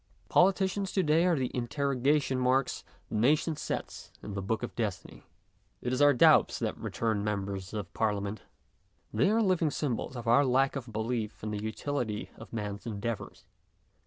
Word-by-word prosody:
Politicians 190 Hz, +1 st, +3 dB
to 190 Hz, -, +2 dB
day 160 Hz, +2 st, +3 dB
are 175 Hz, -, +3 dB
the 130 Hz, -4 st, -1 dB
interrogation 135 Hz, +2 st, +1 dB
marks 130 Hz, +1 st, +1 dB, 0.3 s
the -, -, -9 dB
nation 150 Hz, +8 st, +2 dB
sets -, -, -5 dB
in 105 Hz, -, -6 dB
the 100 Hz, -, -3 dB
book 110 Hz, +5 st, -2 dB
of 120 Hz, -, -5 dB
Destiny. 100 Hz, -8 st, -4 dB, 0.6 s
It 125 Hz, -, -2 dB
is 130 Hz, -, 0 dB
our 145 Hz, 0 st, +7 dB
doubts 125 Hz, -, +5 dB
that -, -, -2 dB
return 110 Hz, -3 st, -2 dB
members 100 Hz, -2 st, -3 dB
of 105 Hz, -5 st, -5 dB
Parliament; 105 Hz, -1 st, -1 dB, 0.7 s
they, 115 Hz, -, +3 dB
are 225 Hz, +2 st, +3 dB
living 180 Hz, -5 st, +2 dB
symbols 130 Hz, -3 st, -2 dB
of 120 Hz, -, -6 dB
our 120 Hz, +5 st, +6 dB
Jack 135 Hz, +1 st, +2 dB
of 130 Hz, -4 st, -5 dB
belief 110 Hz, -1 st, -3 dB
in 105 Hz, -, -3 dB
the 105 Hz, -1 st, -3 dB
utility 110 Hz, 0 st, -3 dB
of 115 Hz, -, -11 dB
man's 105 Hz, -1 st, -5 dB
endeavours. 110 Hz, 0 st, -5 dB
120 Hz, 165 wpm, -30 LUFS, 105-145 Hz, 0.7 s, our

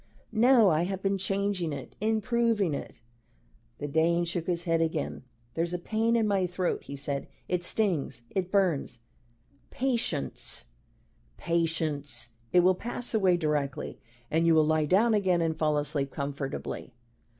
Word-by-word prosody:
"No 230 Hz, -1 st, +6 dB
I 160 Hz, +2 st, +2 dB
have 190 Hz, 0 st, -4 dB
been 195 Hz, 0 st, +1 dB
changing 195 Hz, -3 st, 0 dB
it 140 Hz, -2 st, -7 dB
improving 220 Hz, -4 st, +1 dB
it." -, -, -6 dB, 0.8 s
The 145 Hz, -, -4 dB
Dane 165 Hz, +4 st, +2 dB
shook 170 Hz, -1 st, -2 dB
his 175 Hz, -1 st, -1 dB
head 165 Hz, -1 st, +1 dB
again. 160 Hz, -2 st, -1 dB, 0.3 s
"There's 170 Hz, +2 st, -1 dB
a -, -, 0 dB
pain 220 Hz, +5 st, 0 dB
in 225 Hz, -2 st, +2 dB
my 195 Hz, -3 st, +2 dB
throat," 180 Hz, 0 st, -2 dB
he 140 Hz, -, -6 dB
said; 140 Hz, 0 st, -3 dB, 0.2 s
"it 180 Hz, -1 st, -1 dB
stings 175 Hz, -, 0 dB
it 185 Hz, -1 st, -2 dB
burns!" 175 Hz, -, +1 dB, 0.7 s
"Patience 235 Hz, -, -1 dB, 0.7 s
patience. 160 Hz, -6 st, -1 dB, 0.2 s
It 180 Hz, -, +6 dB
will 185 Hz, +2 st, +5 dB
pass 240 Hz, +6 st, -5 dB
away 190 Hz, -5 st, +4 dB
directly, 150 Hz, -4 st, -2 dB, 0.3 s
and 165 Hz, +2 st, +2 dB
you 165 Hz, -, +5 dB
will 155 Hz, -1 st, +5 dB
lie 155 Hz, 0 st, +2 dB
down 210 Hz, +9 st, +4 dB
again 190 Hz, -4 st, +2 dB
and 165 Hz, -1 st, 0 dB
fall 155 Hz, -1 st, +1 dB
asleep 145 Hz, -1 st, -1 dB
comfortably." 140 Hz, -3 st, -5 dB
175 Hz, 150 wpm, -29 LUFS, 155-200 Hz, 0.8 s, No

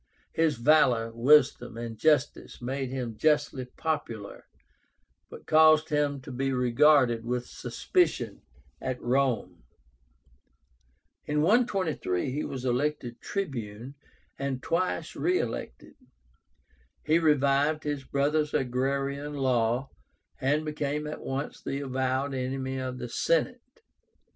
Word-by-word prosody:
His 160 Hz, -2 st, +2 dB
valor, 120 Hz, -3 st, +3 dB
wisdom, 125 Hz, -1 st, +3 dB
and 115 Hz, -1 st, -5 dB
justice 150 Hz, +3 st, +1 dB
made 130 Hz, +1 st, -3 dB
him 125 Hz, -4 st, -4 dB
justly 145 Hz, -3 st, +1 dB
popular, 125 Hz, -7 st, -5 dB, 0.8 s
but -, -, -11 dB
caused 155 Hz, 0 st, +5 dB
him 145 Hz, -2 st, 0 dB
to 130 Hz, -, -9 dB
be 135 Hz, +2 st, -1 dB
regarded 125 Hz, -1 st, +4 dB
with 125 Hz, +1 st, -2 dB
suspicion 360 Hz, -2 st, -1 dB, 0.4 s
at 130 Hz, -1 st, -3 dB
Rome. 130 Hz, -, 0 dB, 1.7 s
In 150 Hz, 0 st, +1 dB
123 185 Hz, -, +1 dB
he 150 Hz, +4 st, -2 dB
was 130 Hz, -1 st, -5 dB
elected 125 Hz, -1 st, -1 dB
Tribune, 125 Hz, -, -5 dB, 0.5 s
and 135 Hz, -2 st, -3 dB
twice 165 Hz, 0 st, -1 dB
re 175 Hz, +6 st, +1 dB
elected. 115 Hz, -, -5 dB, 1.1 s
He 155 Hz, +2 st, +3 dB
revived 150 Hz, 0 st, +2 dB
his 145 Hz, -2 st, -3 dB
brother's 150 Hz, +3 st, 0 dB
agrarian 140 Hz, +3 st, -1 dB
law, 125 Hz, -1 st, 0 dB, 0.5 s
and 145 Hz, +4 st, +1 dB
became 150 Hz, 0 st, -2 dB
at 150 Hz, -, -6 dB
once 135 Hz, +2 st, -4 dB
the 140 Hz, -, -3 dB
avowed 130 Hz, +1 st, -1 dB
enemy 130 Hz, 0 st, -3 dB
of 130 Hz, -1 st, -4 dB
the 120 Hz, -, -5 dB
Senate. 170 Hz, -, 0 dB
140 Hz, 110 wpm, -28 LUFS, 125-150 Hz, 1.7 s, caused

